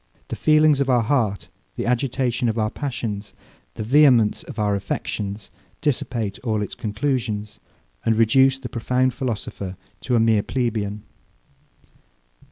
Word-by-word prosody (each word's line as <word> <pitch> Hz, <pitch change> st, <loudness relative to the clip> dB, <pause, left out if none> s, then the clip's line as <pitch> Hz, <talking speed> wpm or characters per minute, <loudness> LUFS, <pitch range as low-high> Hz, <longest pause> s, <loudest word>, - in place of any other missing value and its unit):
The -, -, -3 dB
feelings 155 Hz, -2 st, +4 dB
of 135 Hz, -, 0 dB
our 120 Hz, -2 st, +4 dB
heart, 110 Hz, -6 st, 0 dB, 0.3 s
the -, -, -3 dB
agitation 125 Hz, -1 st, 0 dB
of 110 Hz, -, -2 dB
our 110 Hz, -1 st, 0 dB
passions, 110 Hz, -7 st, -4 dB, 0.4 s
the -, -, -4 dB
vehemence 125 Hz, -3 st, +5 dB
of -, -, -10 dB
our 105 Hz, -1 st, +1 dB
affections, 100 Hz, 0 st, -4 dB, 0.3 s
dissipate 120 Hz, -7 st, -2 dB
all 110 Hz, -4 st, -1 dB
its 100 Hz, -, -6 dB
conclusions, 110 Hz, -2 st, -2 dB, 0.4 s
and 115 Hz, -1 st, +2 dB
reduce 130 Hz, +4 st, +4 dB
the 135 Hz, -2 st, -7 dB
profound 125 Hz, +2 st, 0 dB
philosopher 105 Hz, -6 st, -4 dB, 0.2 s
to 125 Hz, -, -1 dB
a -, -, +4 dB
mere 110 Hz, -2 st, +4 dB
plebeian. 105 Hz, -4 st, -2 dB
115 Hz, 135 wpm, -23 LUFS, 105-130 Hz, 0.4 s, vehemence